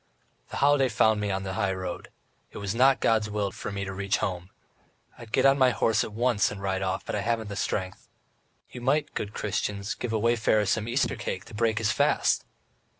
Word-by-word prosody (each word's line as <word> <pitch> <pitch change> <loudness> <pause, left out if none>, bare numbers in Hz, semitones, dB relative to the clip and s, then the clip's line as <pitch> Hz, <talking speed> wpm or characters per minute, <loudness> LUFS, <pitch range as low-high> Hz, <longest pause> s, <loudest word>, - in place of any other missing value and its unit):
"The - - -5
holiday 140 -2 +4
found 110 -2 +3
me 105 - -1
on 95 0 -2
the 95 -1 -4
high 100 -2 0
road. 95 -2 -5 0.4
It - - -11
was 100 -1 -3
not 130 +3 +4
God's 110 -2 +2
will 105 -1 -1
for - - -6
me 100 0 -3
to 95 - -5
reach 100 +1 0
home. 90 -3 -3 0.7
I'd 115 -2 -12
get - - +2
on 135 +1 +5
my 130 -1 +6
horse 110 -1 +2
at - - -6
once 115 -1 +2
and 100 - -7
ride 95 -1 -2
off, 95 0 -2
but - - -4
I 105 - -1
haven't 115 -1 -1
the 100 - -5
strength.... 95 -2 -3 0.6
You 125 - -8
might, 145 +5 +1
good 105 - -4
Christians, 100 0 -2
give 120 - -5
a 110 - +1
wayfarer 110 -1 +2
some 110 +3 0
Easter 120 -2 0
cake 95 - -5
to - - -14
break 110 0 +1
his 110 -1 +1
fast!" - - +2
105 Hz, 215 wpm, -27 LUFS, 100-115 Hz, 0.7 s, my